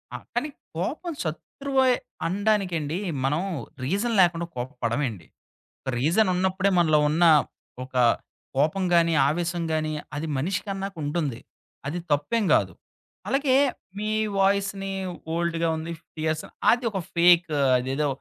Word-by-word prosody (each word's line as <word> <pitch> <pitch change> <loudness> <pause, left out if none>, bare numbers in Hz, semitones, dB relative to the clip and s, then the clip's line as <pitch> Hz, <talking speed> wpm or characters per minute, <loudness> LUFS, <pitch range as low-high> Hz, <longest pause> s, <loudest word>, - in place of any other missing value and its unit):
ఆ! - - -2 0.2
కానీ 300 - 0 0.3
కోపం 300 - -3
శత్రువే 265 - 0 0.3
అనడానికండి 180 -5 0 0.3
మనం 145 +5 +1 0.4
రీజన్ 200 - 0
లేకుండా 170 -1 +2
కోప్పడమండి. 120 - -3 0.6
ఒక - - -5
రీజనున్నప్పుడే 185 - +2
మనలో 155 -3 +4
ఉన్న 160 +3 +2 0.6
ఒక 130 0 -13 0.6
కోపం 155 +7 +2
గాని, 170 -1 +4 0.2
ఆవేశం 170 +2 -1
గాని 155 0 0 0.2
అది 150 +2 -3
మనిషికన్నాకుంటుంది. 170 - -2 0.5
అది 170 +5 -3
తప్పేం 145 +10 +1
కాదు. - - +1 0.5
అలాగే 275 -1 +2 0.4
మీ 210 +1 -2 0.3
వాయిస్‌ని 195 0 +1 0.4
ఓల్డ్‌గా 170 0 0
ఉంది 160 +1 -5 0.2
ఫియర్సా 155 0 -2 0.2
అది 240 +1 +1
ఒక 195 - -2
ఫేకు 170 -2 +4 0.2
అదేదో 135 +4 -1
170 Hz, 110 wpm, -25 LUFS, 150-195 Hz, 0.6 s, మనలో